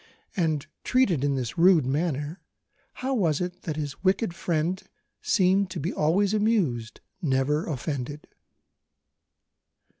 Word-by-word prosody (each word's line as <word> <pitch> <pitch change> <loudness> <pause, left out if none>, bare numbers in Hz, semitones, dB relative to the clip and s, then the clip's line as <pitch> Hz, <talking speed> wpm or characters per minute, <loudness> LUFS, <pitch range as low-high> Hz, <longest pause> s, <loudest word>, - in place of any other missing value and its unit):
And, 155 -6 0 0.2
treated 205 - +2
in 140 -1 +1
this 125 +2 -3
rude 170 -5 +6
manner, 150 +3 -2 0.6
how 270 - +1
was 170 - +1
it 180 0 -4
that 160 -4 -4
his 145 0 -5
wicked 195 0 +2
friend 170 +1 -1 0.4
seemed 190 0 +3
to - - -5
be 165 +6 -2
always 185 +7 +2
amused, 190 - 0 0.2
never 145 0 +1
offended? 145 0 -4
165 Hz, 120 wpm, -26 LUFS, 145-190 Hz, 0.6 s, rude